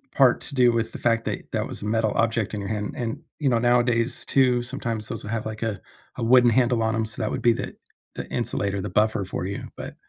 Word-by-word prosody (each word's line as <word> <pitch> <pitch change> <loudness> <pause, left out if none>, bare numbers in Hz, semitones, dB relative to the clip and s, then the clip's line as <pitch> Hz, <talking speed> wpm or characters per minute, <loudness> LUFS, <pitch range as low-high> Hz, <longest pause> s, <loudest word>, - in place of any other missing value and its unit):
part 130 -3 +5
to 140 - -5
do 125 -2 +5
with 115 -1 -1
the - - -7
fact 115 -1 +1
that - - -3
that - - -1
was - - -7
a - - -5
metal 110 0 +1
object 115 -2 +1
in 105 - -2
your 100 - -5
hand, 105 -1 -3
and, 115 -2 -3 0.2
you 140 - +2
know, 120 - +3
nowadays 120 0 +2
too, 125 -3 +3
sometimes 115 -4 -3
those 115 - -6
have 110 +1 -3
like 110 0 -5
a 110 -4 -2 0.4
a 120 - -4
wooden 120 0 +6
handle 120 -1 +2
on 110 0 +1
‘em, 110 0 0
so 110 - -6
that 110 - -1
would - - -3
be 120 -1 +5
the - - -5 0.4
the - - -5
insulator, 100 0 -2
the 105 - -4
buffer 110 -1 +1
for 90 -1 -4
you, 100 - -5
but - - -7
115 Hz, 250 wpm, -24 LUFS, 110-120 Hz, 0.4 s, wooden